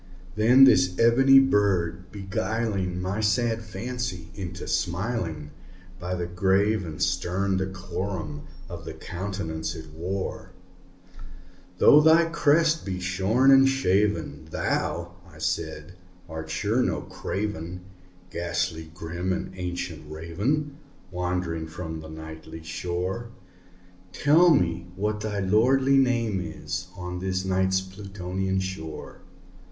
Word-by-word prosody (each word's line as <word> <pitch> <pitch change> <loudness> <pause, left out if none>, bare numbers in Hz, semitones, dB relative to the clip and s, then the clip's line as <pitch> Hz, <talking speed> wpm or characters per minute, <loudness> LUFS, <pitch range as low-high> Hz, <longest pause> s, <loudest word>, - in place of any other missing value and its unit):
Then 120 +5 +6
this 90 -7 +5
ebony 135 +4 +6
bird 95 -8 +2
beguiling 100 -1 -2
my 95 +3 -2
sad 115 +2 +1
fancy 120 -7 -5
into 95 -2 -6
smiling, 85 -5 -2 0.5
By 90 +1 -3
the 90 -1 -2
grave 95 +4 +2
and 80 -3 -7
stern 95 +2 0
decorum 95 -4 -4 0.2
of - - -8
the - - -7
countenance 85 -3 -4
it 80 -2 -9
wore, 90 +4 -4 1.2
"Though 150 +10 +7
thy 160 +2 +6
crest 165 0 +3
be 95 -2 -3
shorn 95 +9 +3
and 135 0 +7
shaven, 100 - 0
thou," - - -2
I - - -16
said, 80 +1 -3 0.3
"art 80 -1 -7
sure 110 +8 +1
no - - 0
craven, 90 -3 -4 0.5
Ghastly 85 -1 -2
grim 85 +1 -3
and 90 - -3
ancient 90 -4 -5
Raven 115 - -2 0.3
wandering 90 -2 -2
from 80 0 -6
the 80 0 -9
Nightly 80 +1 -9
shore 90 +7 -3 0.8
Tell 160 - +5
me 85 - +2
what 105 +2 -1
thy 105 -1 -2
lordly 130 +8 +4
name 115 -7 +1
is 90 +1 -5
on 90 0 -5
the 95 0 -1
Night's 95 0 +2
Plutonian 95 -1 -3
shore!" 95 -5 -6
95 Hz, 115 wpm, -26 LUFS, 85-110 Hz, 1.2 s, Though